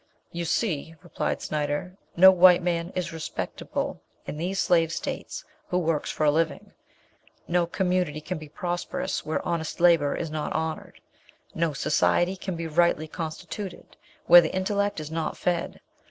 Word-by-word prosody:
"You 170 0 -4
see," 165 -4 -1
replied - - -3
Snyder, 150 +4 -2 0.2
"no 190 +2 +10
white 180 -1 +6
man 170 0 -1
is 180 -2 -3
respectable 160 -1 -4 0.2
in - - -6
these 180 +5 -2
slave 165 -2 +3
states - - -5 0.2
who 180 - 0
works 165 -4 0
for - - -2
a 150 - +5
living. 165 +2 -1 0.7
No 175 0 +1
community 180 -4 0
can 155 +2 -5
be 155 -1 -10
prosperous, 175 +3 -3
where 155 - -3
honest 165 -2 -2
labour 170 -4 +4
is 165 -2 -4
not 155 -1 -3
honoured. 160 0 -4 0.5
No 165 -2 0
society 175 +5 +2
can 185 -1 -5
be 165 0 -4
rightly 160 -1 +2
constituted, 175 +4 -7 0.3
where 175 +1 +10
the 160 - -3
intellect 200 0 0
is 155 0 -7
not 160 -1 -3
fed. 175 -1 -2
170 Hz, 155 wpm, -26 LUFS, 155-180 Hz, 0.7 s, no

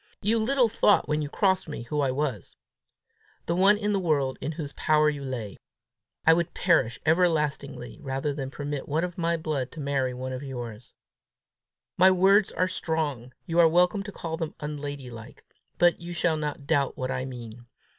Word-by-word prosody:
You 225 +3 +2
little 250 +2 +3
thought 220 -2 +3
when 150 0 0
you 145 - -3
crossed 190 +2 +1
me 145 - -5
who 150 +5 -3
I 135 - +1
was 130 - -3 0.9
the 170 - 0
one 195 +3 +5
in 210 0 -1
the 200 - +1
world 145 -7 0
in 150 +4 -3
whose 150 -3 -6
power 150 0 +3
you 145 -2 -6
lay! 120 -7 -5 0.7
I 160 - +8
would 170 +1 -1
perish 155 -10 +2
ever 175 +3 +4
lastingly 140 -5 -3
rather 135 +1 -2
than 135 -2 -4
permit 145 0 -5
one 155 +4 +1
of 180 0 -4
my 170 0 +1
blood 150 -5 -3
to 160 - -9
marry 135 -3 -1
one 130 +1 -5
of 130 - -5
yours. 120 -4 -7 1.0
My 185 +1 +7
words 190 +2 +4
are 185 - +1
strong; 155 -9 -2
you 170 -1 0
are 170 - +8
welcome 180 +4 +3
to 205 +1 -7
call 165 -3 -5
them 160 -2 -4
unladylike; 145 -6 -7 0.3
but 175 -1 +3
you 175 +1 -6
shall 170 -1 +1
not 150 -2 -4
doubt 140 -3 +1
what 130 0 -2
I 125 - -2
mean. 120 -2 -9
150 Hz, 185 wpm, -27 LUFS, 135-175 Hz, 1.0 s, I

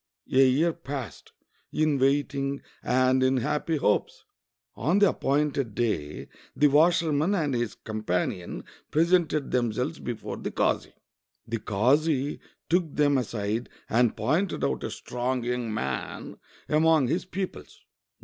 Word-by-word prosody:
A - - +3
year 160 +6 +2
passed 135 - -7 0.4
in 155 -2 +1
waiting 140 0 0 0.2
and 130 +1 +2
in 130 0 +3
happy 150 +5 0
hopes. 105 -7 0 0.5
On 175 +6 +1
the 205 -1 +6
appointed 140 -5 0
day 80 -11 -2 0.3
the 150 - +4
washerman 160 +3 +3
and 150 -7 0
his 120 -2 -1
companion 90 -5 -3 0.3
presented 165 -2 +2
themselves 125 +5 -1
before 120 -3 -5
the - - -4
kazi. - - -1 0.5
The 115 0 -2
kazi 135 +8 +1 0.3
took 170 -3 +1
them 145 -1 +3
aside 110 0 -3 0.2
and 120 0 +2
pointed 175 +7 0
out - - -1
a - - -2
strong 125 0 -3
young 120 -1 -2
man 110 - -4 0.3
among 155 -2 +4
his 165 +9 -1
pupils. 185 +1 -6
135 Hz, 125 wpm, -27 LUFS, 120-155 Hz, 0.5 s, the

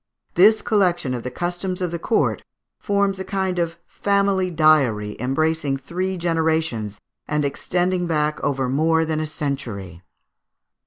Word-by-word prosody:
This 210 +5 +5
collection 175 - +1
of 120 - -3
the 125 - -4
customs 175 +5 -3
of 180 -2 -2
the 170 - -3
court 220 - +1 0.4
forms 200 -1 0
a - - -2
kind 190 -2 -1
of 170 0 -1
family 200 -2 +1
diary 140 -11 +3
embracing 140 +2 0
three 185 +7 -3
generations, 160 - 0 0.3
and 150 -1 0
extending 180 +5 0
back 150 -2 0
over 135 -2 0
more 160 +5 +2
than 155 -1 -1
a 155 - -2
century. 120 - -5
160 Hz, 140 wpm, -22 LUFS, 140-180 Hz, 0.4 s, This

